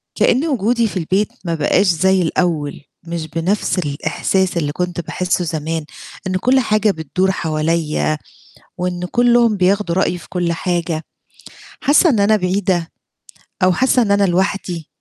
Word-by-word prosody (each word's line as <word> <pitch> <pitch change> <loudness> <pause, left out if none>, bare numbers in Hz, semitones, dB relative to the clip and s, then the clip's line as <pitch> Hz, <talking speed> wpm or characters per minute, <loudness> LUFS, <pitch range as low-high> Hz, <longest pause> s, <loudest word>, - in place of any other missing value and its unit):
كأن 260 +6 +2
وجودي 235 -4 +1
في 200 - -5
البيت 190 +4 0 0.2
ما 170 -1 -1
بقاش 165 +6 +2
زي 185 +2 +3
الأول، 160 -3 -1 0.3
مش 165 -1 -4
بنفس 175 +5 -1
الإحساس 175 +4 -1
اللي 150 -3 0
كنت 175 +2 -3
باحسه 180 +1 -1
زمان، 160 0 -3 0.4
إنه 185 0 -1
كلّ 260 +6 +3
حاجة 215 -3 +2
بتدور 185 +3 -1
حواليّا، 155 -2 -1 0.6
وإن 180 0 -2
كُلّهم 240 -2 +3
بياخدوا 190 -1 +1
رأيي 180 -1 +1
في 170 - -15
كُلّ 175 -2 -1
حاجة، 170 -2 -2 0.8
حاسة 305 +4 +4
إن 225 -7 +2
أنا 210 +2 +4
بعيدة، 180 -3 -1 0.7
أو 185 - +4
حاسة 255 +6 +3
إن 210 - -1
أنا 200 0 +3
لوحدي. 180 -3 -1
180 Hz, 145 wpm, -18 LUFS, 165-200 Hz, 0.8 s, حاسة